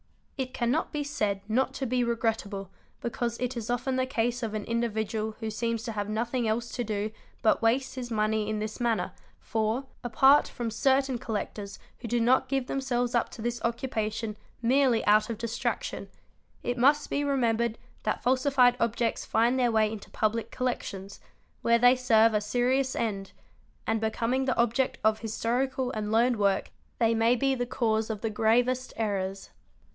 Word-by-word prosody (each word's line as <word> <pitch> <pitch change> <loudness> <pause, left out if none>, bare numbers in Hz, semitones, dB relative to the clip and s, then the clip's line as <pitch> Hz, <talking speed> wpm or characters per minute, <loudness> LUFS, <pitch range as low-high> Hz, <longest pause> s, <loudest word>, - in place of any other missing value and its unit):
It 260 -1 -3
cannot 245 +6 0
be 295 -2 -2
said 210 -9 -1
not 260 +4 +1
to 270 - -2
be 250 0 +1
regrettable 220 -4 -2 0.3
because 235 0 -2
it 250 0 -2
is 230 -1 -5
often 245 +2 0
the 255 0 +1
case 240 -1 -1
of 220 -2 -3
an 210 - -2
individual 220 -2 -2
who 220 -1 -3
seems 230 +1 -2
to 240 - -4
have 205 -1 -3
nothing 235 +2 -1
else 230 +2 -1
to 245 - -2
do 210 -1 -2 0.3
but 220 - +3
waste 250 +4 +1
his 250 -2 -5
money 215 -1 0
in 215 - -1
this 215 +2 -4
manner, 225 -7 0 0.3
for, 220 +4 -1 0.2
apart 265 +4 +5
from 235 -3 -4
certain 265 +2 +2
collectors 205 -3 -4 0.2
who 240 - -6
do 240 +1 +1
not 255 +3 +3
give 270 -1 0
themselves 245 -2 -1
up 235 - +1
to 220 - -9
this 240 0 -2
occu 235 +3 -2
pation 220 -2 -2 0.3
merely 250 -1 +3
out 215 +1 +4
of 230 - -3
distraction, 230 +1 -3 0.5
it 245 0 -2
must 290 +4 +3
be 285 - 0
remembered 235 -5 +1 0.2
that 215 - -2
falsified 255 -1 +4
objects 230 0 0
find 235 +4 +2
their 245 -2 +3
way 215 -1 +3
into 220 -2 -8
public 220 +1 -1
collections, 200 -6 -4 0.4
where 235 0 +4
they 245 +2 +6
serve 230 -3 +4
a 210 - +2
serious 255 +4 +1
end, 200 -4 -2 0.5
and 220 0 0
becoming 230 +4 0
the 260 - 0
object 240 +3 +1
of 220 0 +3
historical 250 +4 -1
and 215 -2 -3
learned 235 +2 +3
work 200 -2 +1 0.3
they 230 -1 +3
may 230 +2 +3
be 270 +2 +1
the 245 -2 -2
cause 220 -3 0
of 215 -2 -4
the 225 - -1
gravest 245 +4 +2
errors. 195 -3 -2
235 Hz, 175 wpm, -28 LUFS, 220-250 Hz, 0.5 s, they